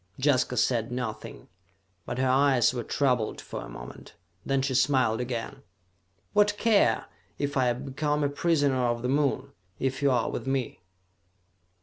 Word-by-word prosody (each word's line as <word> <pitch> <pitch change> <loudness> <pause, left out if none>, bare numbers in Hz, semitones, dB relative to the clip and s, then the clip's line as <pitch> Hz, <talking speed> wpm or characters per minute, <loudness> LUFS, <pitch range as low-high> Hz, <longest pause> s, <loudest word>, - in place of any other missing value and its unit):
Jaska 130 -2 +1
said 120 -2 +1
nothing, 120 -3 -5 0.6
but 120 - -4
her 130 0 +1
eyes 130 -2 +4
were 120 -2 -3
troubled 125 -3 0
for - - -7
a - - -9
moment. - - -11 0.3
Then 135 -1 0
she 135 -1 -1
smiled 130 -3 +2
again. 125 +2 -5 0.7
"What 205 0 +3
care 205 - +3
I - - -15 0.3
if 145 0 -2
I 130 -2 +3
become 145 +4 -2
a 145 - +2
prisoner 145 -4 +1
on 120 -1 0
the - - 0
Moon, 140 0 0 0.3
if 130 0 -2
you 140 - +4
are 125 -3 +1
with - - -5
me?" 135 -6 -2
130 Hz, 155 wpm, -27 LUFS, 125-140 Hz, 0.7 s, eyes